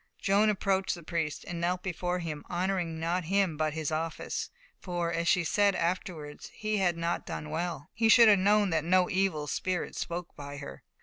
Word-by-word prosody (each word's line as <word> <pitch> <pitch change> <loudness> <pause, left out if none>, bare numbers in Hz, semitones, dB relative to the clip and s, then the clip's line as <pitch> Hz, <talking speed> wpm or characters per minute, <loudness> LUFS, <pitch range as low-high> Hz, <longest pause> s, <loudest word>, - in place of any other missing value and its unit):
Joan 205 +2 +3
approached 195 -2 +1
the 170 - -11
priest 160 -2 -3
and 170 -1 -4
knelt 180 +1 0
before 180 -1 -2
him, 160 -4 -5
honouring 175 -2 -1
not 170 +2 -1
him, 190 -2 +1
but 155 0 0
his 160 -1 -2
office; 160 +1 -3 0.3
for, 175 -2 -2
as 170 +1 -1
she 180 -1 +4
said 200 +3 +3
afterwards, 170 -4 -3
he 215 0 -1
had 175 -3 +1
not 170 +1 -1
done 150 0 -5
well; 165 -2 -3
he 225 -1 +2
should 230 +1 +8
have 205 -2 +6
known 205 0 +3
that 160 -2 +1
no 180 +2 +3
evil 185 -6 +1
spirit 180 +4 -2
spoke 170 0 -5
by 145 0 -8
her. 65 - -8
175 Hz, 190 wpm, -29 LUFS, 160-190 Hz, 0.3 s, should